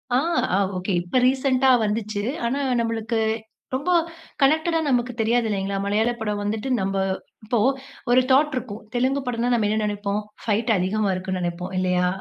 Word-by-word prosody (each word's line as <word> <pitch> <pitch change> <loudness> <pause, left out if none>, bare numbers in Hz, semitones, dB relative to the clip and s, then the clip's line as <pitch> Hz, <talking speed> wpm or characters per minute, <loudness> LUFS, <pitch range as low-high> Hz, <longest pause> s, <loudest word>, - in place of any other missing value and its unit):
ஆ, - - +5 0.4
அ - - +3 0.2
okay. 185 +1 -2
இப்ப 180 +9 0
ரீசென்ட்டா 265 0 +2 0.2
வந்துச்சு. 210 -1 -2 0.2
ஆனா 255 +4 0 0.2
நம்மளுக்கு 230 0 -1 0.6
ரொம்ப 285 +7 -2 0.5
கனெக்டடா 315 +4 +3
நமக்கு 250 -1 +1
தெரியாது 230 +1 +2
இல்லேங்களா! 195 -1 -1
மலையாள 220 +4 +2
படம் 210 -2 -2
வந்துட்டு 215 +5 -2
நம்ப 195 0 -1 0.5
இப்போ 235 +3 0 0.5
ஒரு 255 - +6
தாட் 295 +3 +4
இருக்கும். 225 -4 -4
தெலுங்கு 260 +3 +1
படம்ன்னா, 245 0 -1
நாம் 225 -3 +2
என்ன 215 +1 +1
நினைப்போம், 205 0 -1 0.2
ஃபைட் 225 +2 0
அதிகமாக 195 +2 0
இருக்குன்னு 185 0 -3
நினைப்போம். 180 +2 -4
இல்லயா? 180 -1 +2
220 Hz, 150 wpm, -23 LUFS, 200-250 Hz, 0.6 s, ஒரு